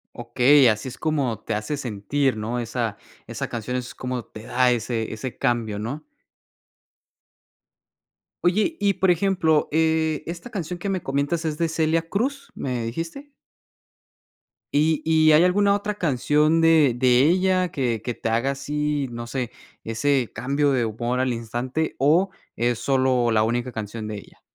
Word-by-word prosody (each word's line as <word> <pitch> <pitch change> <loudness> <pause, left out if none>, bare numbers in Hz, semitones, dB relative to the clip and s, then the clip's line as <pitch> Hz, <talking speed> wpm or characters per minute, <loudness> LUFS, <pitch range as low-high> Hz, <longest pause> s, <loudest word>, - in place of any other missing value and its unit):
Okey, 125 +3 +4
así 110 +4 -1
es 125 - -7
como 140 -8 -1
te 115 - -4
hace 110 +8 -2
sentir, 125 +2 -1
¿no? 115 +3 -3
Esa 115 -2 -3 0.3
esa - - -4
canción 120 +2 -4
es 125 0 -6
como 125 -2 -4
te 110 - -11
da 125 +1 +2
ese 115 -1 -2
ese 120 +3 -6
cambio, 120 -5 0
¿no? 130 +9 -5 2.4
Oye, 210 - +2
y 200 -1 +2
por 190 -1 +2
ejemplo, 170 -4 +2
eh, 160 -1 +1
esta 170 +7 -7
canción 180 -4 -5
que 200 - -4
me 190 -3 -2
comentas, 140 +5 -1
¿es 155 -2 -2
de 165 - +1
Celia 160 0 0
Cruz, 265 +9 -2
me 125 -3 -3
dijiste? 165 - -6 1.4
¿Y 155 +2 +2
y 160 -1 +4
hay 155 +3 +6
alguna 200 +2 +3
otra 205 0 -3
canción 150 - +2
de 160 -6 +5
de 125 0 +4
ella 185 +2 +2
que 120 -6 -1
que 120 - -2
te 115 - -4
haga 115 +5 +1
así, 145 0 -2
no 120 0 -6
sé, 125 -1 -4 0.3
ese 125 +2 0
cambio 140 +2 0
de 125 -3 +1
humor 120 +3 -2
al 130 -1 +1
instante 120 +7 -3
o 165 +8 +3 0.3
es 120 0 0
solo 130 -3 +2
la 110 - +3
única 120 +2 -1
canción 110 0 -5
de 105 - -5
ella? 100 - -14
135 Hz, 160 wpm, -23 LUFS, 120-160 Hz, 2.4 s, hay